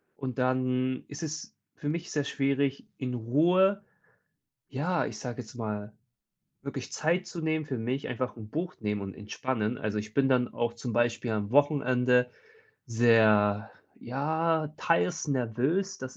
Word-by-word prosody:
Und 130 -2 -5
dann 130 0 +1
ist 145 +3 -7
es 155 0 -5 0.2
für 145 - -3
mich 170 +3 -3
sehr 145 -2 +1
schwierig 140 0 0
in 125 -2 -3
Ruhe, 180 - +3 0.9
ja, 160 +5 0
ich - - -6
sage 125 -1 -5
jetzt 110 - -14
mal 105 -2 -4 0.7
wirklich - - -5
Zeit 175 +4 +1
zu 170 - -6
nehmen 155 -1 0
für 130 -4 -3
mich 125 +5 -2
einfach 125 0 -3
'n 110 -2 -9
Buch 175 +6 -3
nehmen 105 -1 -1
und 95 -1 -5
entspannen. 110 +2 -2
Also, 105 -1 -2
ich 105 +1 -6
bin 135 -1 +4
dann 125 -2 +3
auch 120 0 -1
zum 120 0 -5
Beispiel 120 0 +1
am 105 0 -2
Wochenende 125 -3 +3 0.6
sehr, 110 -2 +4 0.3
ja, 155 +4 0
teils 90 - +1
nervös, 135 - 0
dass 130 -1 -7
130 Hz, 150 wpm, -29 LUFS, 115-150 Hz, 0.9 s, bin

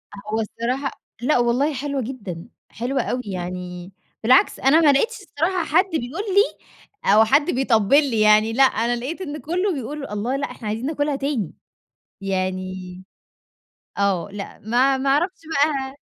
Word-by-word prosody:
أ 205 +1 -9
هو 225 - +1
الصراحة 250 +5 -2 0.3
لأ 255 +4 +2
والله 245 +5 +2
حلوة 280 0 -2
جدًا، 205 -9 -6 0.2
حلوة 250 +4 -2
أوي، 250 - -2
يعني 180 -1 -6 0.3
بالعكس 250 +4 +4
أنا 275 +5 +5
ما 300 -3 +6
لقيتش 450 - +1
الصراحة 355 0 -1
حد 330 +4 +3
بيقول 315 +6 -3
لي 400 +3 +2 0.6
أو 220 - +7
حد 290 +8 +3
بيطبِّل 245 -2 +3 0.2
لي 220 - +1
يعني، 215 +1 +5
لأ 270 - +5
أنا 240 -1 +2
لقيت 265 +10 -5
إن 300 -5 -5
كلّه 360 +6 -1
بيقول: 285 +1 -5
"الله! 210 +6 -2
لأ 280 +1 -3
إحنا 220 - -8
عايزين 220 +4 -3
ناكلها 290 -1 -1
تاني." 275 - -2 0.7
يعني 185 -1 -3 1.0
آه 195 -4 +1
لأ 200 -1 -7
ما 250 +5 +2
ما 270 +1 0
أعرَفش 345 +7 +1
بقي 280 -2 0
255 Hz, 155 wpm, -22 LUFS, 210-290 Hz, 1.0 s, أو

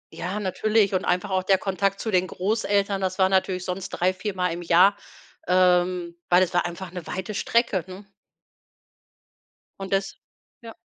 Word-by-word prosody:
Ja, 185 +4 -4
natürlich, 210 +1 +1
und 185 +1 0
einfach 180 +3 0
auch 185 0 +1
der 190 +1 +3
Kontakt 195 +1 -1
zu 220 - -3
den 185 -1 +2
Großeltern, 200 0 -1
das 185 -1 -2
war 190 -1 +3
natürlich 185 -1 0
sonst 185 +1 -4
3, 185 +1 0
4-mal 185 -2 -2
im 170 - -6
Jahr, 180 +4 +5 0.5
ähm, 180 -1 +2 0.2
weil 180 +1 +5
das 185 - 0
war 175 - +2
einfach 175 +1 -8
'ne 180 -2 -8
weite 190 +3 -5
Strecke, 215 -4 +1
ne? 190 +2 -10 1.7
Und 195 0 -5
das 195 0 -1 0.5
ja. 230 -1 -11
185 Hz, 165 wpm, -24 LUFS, 180-200 Hz, 1.7 s, Jahr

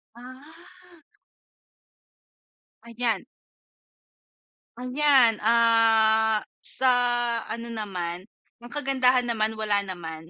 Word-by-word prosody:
Ah. 320 +7 -16 1.8
Ayan. 235 -2 -3 1.5
Ayan, 255 -2 +3
ah, 225 -1 +3 0.2
sa 260 - -1 0.6
ano 235 +1 -6
naman, 185 -6 -6 0.4
ang 240 - -12
kagandahan 260 -3 +1
naman 220 -2 -1
wala 205 -2 0
naman. 165 -4 -8
230 Hz, 70 wpm, -24 LUFS, 215-255 Hz, 1.8 s, Ayan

